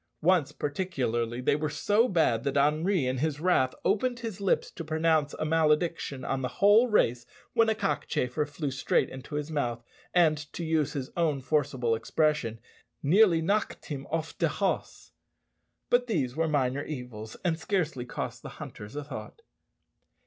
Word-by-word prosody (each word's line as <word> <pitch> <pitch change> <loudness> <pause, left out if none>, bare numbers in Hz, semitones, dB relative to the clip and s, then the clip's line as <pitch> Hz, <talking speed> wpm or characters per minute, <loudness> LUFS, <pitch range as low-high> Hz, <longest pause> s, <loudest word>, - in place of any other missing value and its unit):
Once 175 -4 +3
particularly 125 -7 -2
they 130 - +2
were 155 +1 -1
so 210 +10 +2
bad 160 - +2
that 140 0 0
Henri 155 +3 +2
in 130 0 -1
his 150 0 -1
wrath 155 -7 +2
opened 240 +5 +1
his 220 -5 -5
lips 195 - +1
to 165 - -7
pronounce 155 -1 +1
a - - -3
malediction 155 -3 +1
on 135 0 -1
the 130 - -1
whole 210 +5 +6
race, 120 - +2 0.3
when 230 -2 +4
a 220 - +2
cockchafer 155 -9 -1
flew 145 0 -4
straight 130 - +1
into 130 +3 -8
his 150 +1 -3
mouth, 120 -6 -2 0.3
and, 155 -4 +2
to 170 - -4
use 155 -3 +1
his 135 -2 -4
own 160 -5 +1
forcible 135 -4 0
expression, 115 0 0 0.4
"nearly 170 +1 +5
knocked 205 +5 -1
him 140 -3 -6
off 160 +1 -3
de - - +3
hoss." - - -2 0.8
But 245 0 +3
these 140 - -1
were 165 0 +1
minor 140 -2 0
evils, 125 -7 -7
and 165 -2 +1
scarcely 165 -9 -1
cost 125 - -5
the - - -8
hunters 105 +3 -9
a 145 - -3
thought. 300 - -9
150 Hz, 165 wpm, -28 LUFS, 130-175 Hz, 0.8 s, whole